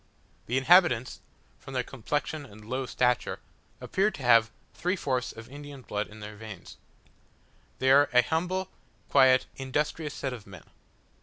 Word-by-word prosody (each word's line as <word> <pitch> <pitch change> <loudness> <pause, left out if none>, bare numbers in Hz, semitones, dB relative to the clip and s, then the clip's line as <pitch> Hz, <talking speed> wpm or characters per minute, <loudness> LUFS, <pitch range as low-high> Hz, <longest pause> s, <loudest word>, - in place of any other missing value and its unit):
The 125 - 0
inhabitants, 130 -3 +4 0.4
from 135 - -10
their 125 - +1
complexion 145 +5 -3
and 110 -5 -14
low 130 +3 -3
stature; 125 0 +1 0.4
appear 195 +3 +1
to 145 -10 -9
have 115 -2 +5 0.2
three 180 +2 -1
fourths 130 -8 -1
of 110 0 -11
Indian 145 0 -10
blood 105 -1 -3
in 110 +1 -13
their 105 0 -8
veins. 105 -4 -10 1.0
They 130 0 +3
are 145 +1 +6
an 125 0 +5
humble, 180 +3 -1 0.4
quiet, 130 -1 +5
industrious 150 +3 -2
set 130 -2 -3
of 110 -5 -10
men. 90 -4 -12
130 Hz, 150 wpm, -28 LUFS, 115-145 Hz, 1.0 s, are